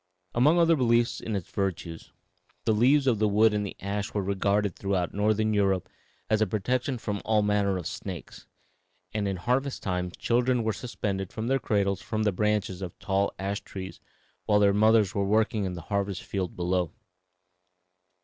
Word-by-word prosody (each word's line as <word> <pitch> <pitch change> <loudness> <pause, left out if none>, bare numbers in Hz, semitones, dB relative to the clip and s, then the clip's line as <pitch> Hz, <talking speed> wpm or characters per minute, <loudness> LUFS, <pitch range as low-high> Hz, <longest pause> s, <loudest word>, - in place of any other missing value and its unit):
Among 145 +8 +4
other 165 -1 +5
beliefs 120 -3 +2
in 110 - -4
its 95 -4 -5
virtues, 85 -4 -3 0.5
the - - +3
leaves 135 +6 +4
and 115 -5 +2
wood 105 +1 +4
of 105 - 0
the 100 - -5
ash 100 +2 -3
were 100 - 0
regarded 100 0 0
throughout 95 -3 -1
Northern 110 +1 +1
Europe 95 -3 +1 0.4
as 110 0 +1
a 110 - +3
protection 125 +7 -1
from 105 -3 -4
all 110 -1 +2
manner 100 -2 +1
of 90 - -6
snakes, - - -7 0.7
and 105 -2 -1
in 95 - -1
harvest 130 +8 -1
time 90 -2 -1
children 120 +5 +1
were 110 0 0
suspended 100 -6 -4
in 110 - -2
their 135 +2 +2
cradles 100 -4 0
from 110 -1 -2
the 105 - +2
branches 105 -1 0
of 90 -3 -6
tall 100 0 0
ash 100 +1 -3
trees 95 -1 -8 0.5
while 105 - +4
their 100 -1 +4
mothers 110 -1 +4
were 100 - 0
working 110 0 +1
in 90 - -3
the 85 - -6
harvest 100 +1 -2
field 95 -3 -3
below. 90 -1 0
105 Hz, 175 wpm, -27 LUFS, 95-110 Hz, 0.7 s, other